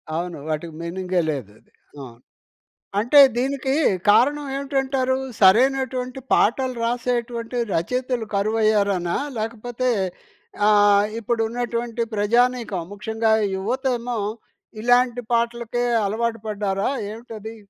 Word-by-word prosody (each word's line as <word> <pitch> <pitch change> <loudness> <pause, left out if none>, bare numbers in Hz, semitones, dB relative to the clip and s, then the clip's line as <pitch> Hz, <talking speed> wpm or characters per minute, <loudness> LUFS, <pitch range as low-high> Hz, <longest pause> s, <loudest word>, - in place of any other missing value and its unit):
అవును. 175 0 -3
వాటికి 155 +1 -3
మీనింగే 180 +1 -1
లేదది. 110 -8 -6 0.3
ఆ! - - -7 1.0
అంటే 245 +7 +5 0.2
దీనికి 265 +1 -1 0.4
కారణం 290 +7 +4
ఏమిటంటారు? 270 -2 0 0.3
సరైనటువంటి 255 +5 +3
పాటలు 255 +3 +2
రాసేటువంటి 240 0 -2 0.2
రచయితలు 250 +6 -1
కరువయ్యారనా? 200 -4 +1 0.2
లేకపోతే 230 +3 -3 0.8
ఆహ్, 205 -1 +5
ఇప్పుడున్నటువంటి 235 +1 -2
ప్రజానీకం 235 -2 +1
ముఖ్యంగా 220 +2 -1 0.2
యువతేమో 245 +3 -2 0.6
ఇలాంటి 245 0 +3
పాటలకే 235 +1 0 0.2
అలవాటు 230 +2 -2
పడ్డారా 200 0 -1 0.2
ఏమిటది? 225 -1 -9
230 Hz, 85 wpm, -22 LUFS, 205-250 Hz, 1.0 s, అంటే